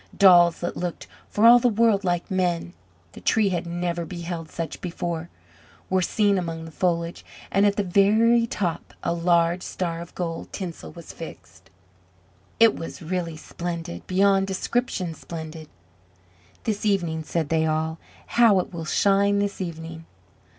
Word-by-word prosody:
Dolls 175 -4 +6
that 175 - -3
looked 175 -1 -4 0.2
for 210 - +2
all 240 +1 +9
the 245 - +2
world 220 -2 +3
like 175 0 -1
men 175 - 0 0.4
the - - -12
Tree 215 -3 +3
had 175 -1 -2
never 175 0 -2
beheld 170 -1 -6
such 165 -1 -5
before 170 -1 -4 0.6
were 190 0 +3
seen 200 +1 +2
among 165 -2 -4
the 165 - -10
foliage, 170 0 -1 0.3
and 200 +1 +4
at 200 - +1
the 205 - 0
very 220 +5 +4
top 180 -7 -3
a - - 0
large 170 0 +2
star 170 -3 -3
of 170 - -11
gold 165 -2 -4
tinsel 170 - -6
was - - -11
fixed. - - -11 0.9
It 230 -1 +6
was 165 - -7
really 170 -1 -3
splendid 170 +1 -6
beyond 195 +1 +3
description 190 -2 -1
splendid. 160 -1 -8 0.9
"This 210 -2 -2
evening!" 175 -6 0
said 160 -1 -2
they 160 -1 +2
all; 160 +1 -1 0.3
"how 230 -4 +5
it 180 - -4
will 165 -1 -5
shine 200 +4 +3
this 200 -1 -1
evening!" 165 -2 -6
175 Hz, 150 wpm, -24 LUFS, 165-200 Hz, 0.9 s, all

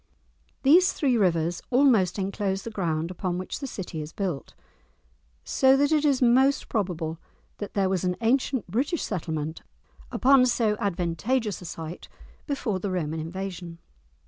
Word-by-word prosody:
These 350 +7 +6
three 265 -4 +1
rivers 175 -4 +1
almost 245 -9 +4
enclose 195 0 -2
the 230 - -6
ground 170 -4 -2
upon 180 -1 -3
which 185 - -5
the 275 - -4
city 180 -9 -6
is 150 +2 -8
built, 180 -8 -4 0.9
so 265 0 +4
that 285 +2 +2
it 305 -1 +3
is 275 -4 +3
most 260 +3 +3
probable 170 -7 -2 0.4
that 205 - -6
there 195 -2 +2
was 190 -2 0
an 180 0 0
ancient 250 +1 +1
British 260 - -1
settlement 160 -4 -3 0.5
upon 265 -1 +5
so 225 -3 +2
advantageous 200 +5 -1
a - - -9
site, 165 +1 -7 0.4
before 240 -9 -1
the 200 - -3
Roman 160 -4 -2
invasion. 175 0 -6
195 Hz, 145 wpm, -26 LUFS, 175-255 Hz, 0.9 s, These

